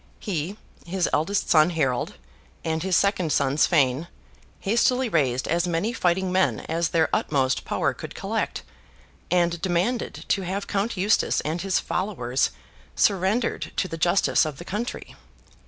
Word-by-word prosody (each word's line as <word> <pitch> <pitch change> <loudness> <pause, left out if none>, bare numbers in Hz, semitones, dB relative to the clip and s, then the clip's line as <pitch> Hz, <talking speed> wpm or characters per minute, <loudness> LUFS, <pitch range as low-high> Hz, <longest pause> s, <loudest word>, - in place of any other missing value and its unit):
He, 185 0 -3 0.3
his 180 +1 -1
eldest 195 +7 +1
son 155 +1 +6
Harold, 135 -8 -1 0.5
and 160 0 -1
his 185 +1 +1
second 185 -5 +2
son 140 +1 +1
Sweyn, 145 -1 +3 0.5
hastily 245 +4 +2
raised 130 - +1
as 170 +2 +1
many 175 +7 0
fighting 185 -2 +1
men 145 - +2
as 165 +1 -1
their 160 -1 +2
utmost 135 -2 +1
power - - 0
could - - -9
collect, - - -2 0.7
and 170 -1 +1
demanded 190 +8 -1
to 195 - +2
have 190 +2 -3
Count 205 +2 -2
Eustace 200 +4 +2
and 160 +3 -3
his 195 0 +1
followers 135 -11 -1 0.5
surrendered 200 +5 +1
to 190 - 0
the 165 - -5
justice 175 +4 +3
of 155 -4 -4
the 175 - -9
country. 215 +6 -5
175 Hz, 145 wpm, -25 LUFS, 155-195 Hz, 0.7 s, son